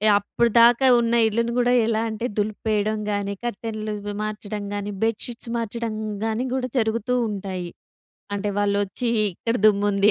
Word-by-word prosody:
అప్పటిదాకా 235 +4 +4
ఉన్న 235 0 +1
ఇల్లుని 235 +2 0
గూడా 245 0 +3
ఎలా 225 -1 +1
అంటే 220 +2 -4
దులిపేయడం 215 0 0
గానీ 200 0 -1
కర్టెన్‌లు 215 -2 -4
ఇవి 205 0 -5
మార్చడం 210 -1 -4
గానీ 205 0 -3
బెడ్ 225 -1 +1
షీట్స్ 235 -1 -7
మార్చడం 230 0 -3 0.3
గానీ 225 +3 -1
గూడా 255 -1 -1
జరుగుతూ 230 +2 +1
ఉంటాయి. 190 -3 -4 0.7
అంటే 205 +1 -2
వాళ్ళొచ్చి 205 +3 0 0.2
ఇక్కడ 230 +6 -2
దుమ్ముంది 205 -1 +4
215 Hz, 135 wpm, -23 LUFS, 205-235 Hz, 0.7 s, అప్పటిదాకా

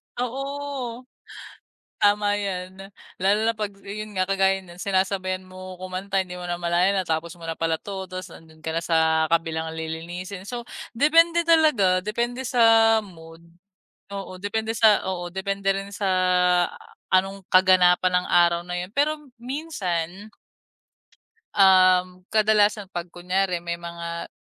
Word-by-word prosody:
Oo, 265 -1 -4 1.0
tama 205 0 +2
yan 190 -1 -5 0.4
lalo 195 +3 +3
na 230 - +2
pag 210 -2 -3
yun 210 +1 -7
nga 185 - +2
kagaya 195 0 +2
ng 175 -1 -14
sinasabayan 185 -1 -1
mo 185 0 -10
kumanta 185 +1 -3
hindi 185 -1 -4
mo 180 - -8
namalayan 175 +2 +1
natapos 165 -1 -2
mo - - -13
na 165 - -3
pala 165 0 0
to 195 -2 -6
tas 185 0 -6
nandun 160 -1 -16
ka 160 - -3
na - - +1
sa 160 -1 +2
kabilang 160 -1 0
lilinisin 175 +4 -6
so 240 +1 -5 0.3
depende 330 +6 +4
talaga 300 - +4
depende 240 +5 -2
sa 225 -2 +5
mood 165 -3 -14 0.7
oo 195 -2 -7
depende 220 +3 -2
sa 215 -1 +5
oo 175 -1 -4
depende 195 +1 -1
rin 195 0 -5
sa 200 0 -3 1.0
anong 195 +1 +1
kaganapan 185 -1 +5
ng - - -8
araw 170 -1 +4
na 180 - -5
yun 180 +1 -5
pero 305 +2 +1 0.2
minsan 205 - -4 1.3
Um 185 -1 +4
kadalasan 210 -2 +2
pag 175 0 -5
kunyari 180 0 -2
may 170 0 -4
mga 170 0 -6
190 Hz, 135 wpm, -24 LUFS, 175-210 Hz, 1.3 s, sa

